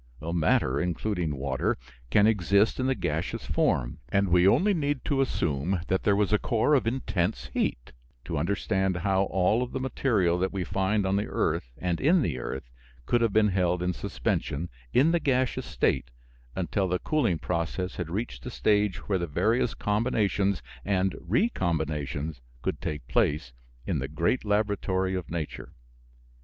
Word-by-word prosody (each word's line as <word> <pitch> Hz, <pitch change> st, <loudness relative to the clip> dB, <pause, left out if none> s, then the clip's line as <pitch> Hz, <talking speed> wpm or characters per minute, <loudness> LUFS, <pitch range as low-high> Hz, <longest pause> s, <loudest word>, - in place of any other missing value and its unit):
Matter, 80 Hz, -5 st, +1 dB
including 90 Hz, -2 st, -1 dB
water, 65 Hz, -1 st, -1 dB, 0.3 s
can 100 Hz, +11 st, +5 dB
exist 105 Hz, +1 st, +3 dB
in 130 Hz, -, +1 dB
the 135 Hz, -, +2 dB
gaseous 80 Hz, -4 st, -2 dB
form, -, -, 0 dB
and 100 Hz, +4 st, +2 dB
we 90 Hz, +1 st, +5 dB
only 200 Hz, -, +4 dB
need 145 Hz, -5 st, -1 dB
to 140 Hz, -3 st, +1 dB
assume 85 Hz, -, 0 dB
that 95 Hz, -, +2 dB
there 100 Hz, -, +3 dB
was 105 Hz, +1 st, +1 dB
a 105 Hz, -, +4 dB
core 115 Hz, +6 st, +1 dB
of 130 Hz, -6 st, +3 dB
intense 105 Hz, -6 st, -1 dB
heat, -, -, -1 dB, 0.3 s
to -, -, -3 dB
understand 95 Hz, +2 st, 0 dB
how 95 Hz, +1 st, +1 dB
all 95 Hz, +7 st, +1 dB
the 130 Hz, -, -4 dB
material 110 Hz, -9 st, +1 dB
that 95 Hz, +1 st, 0 dB
we 95 Hz, -2 st, -2 dB
find 95 Hz, +3 st, 0 dB
on 95 Hz, +1 st, +1 dB
the 105 Hz, -, -1 dB
earth -, -, -1 dB
and 90 Hz, -2 st, -2 dB
in 165 Hz, +3 st, +4 dB
the 70 Hz, -, -2 dB
earth 65 Hz, +1 st, -5 dB, 0.4 s
could 120 Hz, -, +2 dB
have 115 Hz, -2 st, +2 dB
been 105 Hz, 0 st, +4 dB
held 90 Hz, -2 st, +1 dB
in 90 Hz, 0 st, 0 dB
suspension 85 Hz, -1 st, -2 dB, 0.2 s
in 145 Hz, +6 st, +4 dB
the 170 Hz, -, +2 dB
gaseous 130 Hz, -4 st, 0 dB
state 65 Hz, -2 st, 0 dB, 0.5 s
until 95 Hz, +1 st, 0 dB
the 90 Hz, 0 st, +1 dB
cooling 120 Hz, -, +1 dB
process 90 Hz, +3 st, -2 dB
had 85 Hz, -3 st, -3 dB
reached 105 Hz, +8 st, -4 dB
a -, -, -2 dB
stage 105 Hz, -5 st, +1 dB
where 95 Hz, -2 st, +1 dB
the 85 Hz, -, -2 dB
various 110 Hz, -, +1 dB
combinations 105 Hz, -3 st, 0 dB, 0.2 s
and 95 Hz, -1 st, +1 dB
recombinations 80 Hz, -, -1 dB, 0.2 s
could -, -, -2 dB
take 75 Hz, -6 st, -4 dB
place 65 Hz, -1 st, +1 dB, 0.3 s
in -, -, -1 dB
the -, -, -3 dB
great 130 Hz, -, 0 dB
laboratory 100 Hz, -3 st, 0 dB
of 90 Hz, -3 st, -4 dB
nature. 80 Hz, -3 st, -5 dB
95 Hz, 165 wpm, -27 LUFS, 85-110 Hz, 0.5 s, can